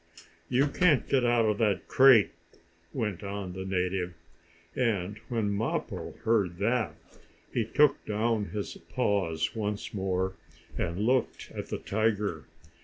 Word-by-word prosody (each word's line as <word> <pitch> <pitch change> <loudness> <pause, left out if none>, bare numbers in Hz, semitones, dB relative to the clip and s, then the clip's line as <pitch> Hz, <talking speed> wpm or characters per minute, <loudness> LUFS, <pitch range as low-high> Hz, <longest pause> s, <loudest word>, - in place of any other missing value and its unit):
"You 135 +4 +3
can't 155 -1 +3
get 135 -2 +2
out 120 -1 +3
of 105 -1 +1
that 105 -4 +1
crate!" 130 -6 +6 0.6
went 105 -7 -3
on 100 -2 -5
the 95 0 -5
native, 90 -1 -1 0.6
and 105 -5 0
when 110 -4 0
Mappo 110 +3 -3
heard 105 -7 +2
that, 115 +3 0 0.6
he 120 - +1
took 145 +6 +3
down 110 0 0
his 105 0 -5
paws 95 -9 0
once 105 -2 -3
more, 95 -1 -1 0.4
and 85 +5 -2
looked 130 +1 0
at - - -6
the - - -3
tiger. 105 -6 -1
105 Hz, 130 wpm, -29 LUFS, 95-115 Hz, 0.6 s, crate